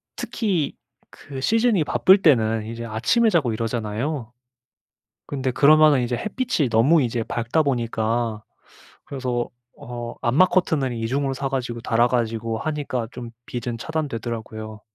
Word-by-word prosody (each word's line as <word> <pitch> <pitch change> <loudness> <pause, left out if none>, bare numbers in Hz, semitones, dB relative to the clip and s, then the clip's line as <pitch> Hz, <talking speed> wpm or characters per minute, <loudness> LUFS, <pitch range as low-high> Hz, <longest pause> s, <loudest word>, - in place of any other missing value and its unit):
특히 185 - -1 0.3
그 135 -2 -9
시즌이 225 - +3
바쁠 190 +6 +4
때는 115 - +3
이제 115 +1 -6
아침에 120 - +2
자고 155 - +1
이러잖아요. 115 +3 -3 0.9
근데 135 -2 -2
그러면은 150 +1 +5
이제 120 0 -1
햇빛이 215 - -1
너무 130 +9 +4
이제 120 -2 -1
밝다 120 +8 0
보니까 115 -4 -1 0.6
그래서 125 -3 -3 0.3
어 120 -4 -7
암막 135 +10 +4
커튼을 155 -8 +1
2 115 -1 -3
중으로 135 +2 -1
사 135 +1 -2
가지고 125 -3 -3
달아 115 +1 +2
가지고 115 -2 -1
하니까 145 -6 -3
좀 120 -1 -8 0.2
빛은 120 -1 -4
차단되더라고요. 115 -7 -5
125 Hz, 305 characters per minute, -23 LUFS, 115-150 Hz, 0.9 s, 그러면은